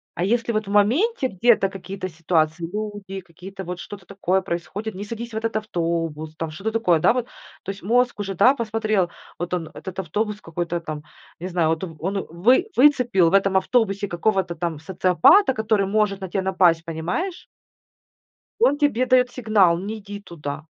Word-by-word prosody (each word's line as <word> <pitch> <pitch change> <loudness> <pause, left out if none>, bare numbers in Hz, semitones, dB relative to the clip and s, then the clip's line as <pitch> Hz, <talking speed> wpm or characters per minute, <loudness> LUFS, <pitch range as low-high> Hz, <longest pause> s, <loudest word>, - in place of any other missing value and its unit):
А 175 - -2
если 235 +3 +1
вот 215 -2 -1
в - - -5
моменте 260 - +2
где-то 210 -1 +3
какие-то 190 0 -6
ситуации, 160 0 0
люди 205 -2 -5
какие-то 190 +2 -10
вот 180 0 -6
что-то 195 -1 -9
такое 190 -1 0
происходит, 185 +5 -5
не 195 - -5
садись 230 +2 -6
в 220 - -3
этот 225 0 -2
автобус 165 -6 -2
там, 165 -1 -4
что-то 195 +8 -4
такое, 180 -8 +2
да - - +4
вот. 245 -1 -2 0.4
То - - -7
есть 195 -2 -12
мозг 245 +2 +2
уже, 195 -1 -3
да, 240 +9 +6
посмотрел, 215 -6 0 0.3
вот 175 +1 -4
он 165 -3 -2
этот 190 0 -7
автобус 210 +4 -2
какой-то 170 +1 -3
там, 155 -2 -6 0.4
не 180 - -5
знаю, 170 -3 +1
вот 160 +2 -1
он 165 - -10
он 195 +3 -2
вы 240 - +3
выцепил 245 - +4
в - - -6
этом 195 -1 +3
автобусе 200 -1 +1
какого-то 185 -1 0
там 165 -2 -3
социопата, 185 - +4
который 220 -3 +1
может 205 -1 +1
на 190 - -5
тебя 190 +1 -1
напасть, 180 -3 +3
понимаешь? 175 - -3 1.2
Он 290 - +4
тебе 280 -4 +1
дает 250 -1 +4
сигнал, 205 -9 +3
не 210 +4 -5
иди 205 -1 -8
туда, 150 -5 -7
195 Hz, 180 wpm, -23 LUFS, 170-220 Hz, 1.2 s, да